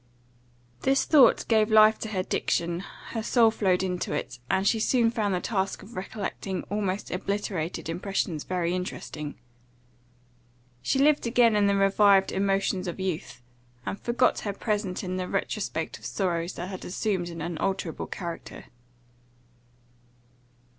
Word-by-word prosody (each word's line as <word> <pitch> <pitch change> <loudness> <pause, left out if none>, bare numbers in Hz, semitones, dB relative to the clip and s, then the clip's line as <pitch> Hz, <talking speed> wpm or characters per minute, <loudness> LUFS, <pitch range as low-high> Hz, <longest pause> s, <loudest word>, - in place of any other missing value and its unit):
This 270 +1 +2
thought 290 -5 +5
gave 220 -1 +3
life 215 0 +6
to - - -4
her 190 -3 -1
diction, 170 -1 -1 0.3
her 225 - -3
soul 225 0 +4
flowed 190 -4 +1
into 180 -1 -2
it, 125 - -4
and 190 +1 +2
she 225 - +3
soon 230 +1 +3
found 210 -5 0
the - - 0
task 195 0 -2
of 220 +4 -13
recollecting 190 -1 -4
almost 205 -1 -2
obliterated 185 -4 -3
impressions 175 -2 -2
very 175 -2 -1
interesting. 155 -4 -5 1.5
She - - 0
lived 290 -2 +3
again 235 -2 +4
in 205 -1 +4
the 200 - +3
revived 195 0 +4
emotions 195 -1 0
of 175 - -5
youth, 155 -9 -4 0.4
and 200 - -4
forgot 235 0 +2
her 205 - -3
present 205 -3 -2
in 185 0 -3
the 185 -1 -2
retrospect 195 - -2
of 110 - -13
sorrows 170 +6 -1
that 175 +2 -6
had 190 -2 -7
assumed 185 -1 -2
an 165 -1 -7
unalterable 170 +1 -3
character. 170 -3 -7
195 Hz, 140 wpm, -27 LUFS, 180-215 Hz, 1.5 s, life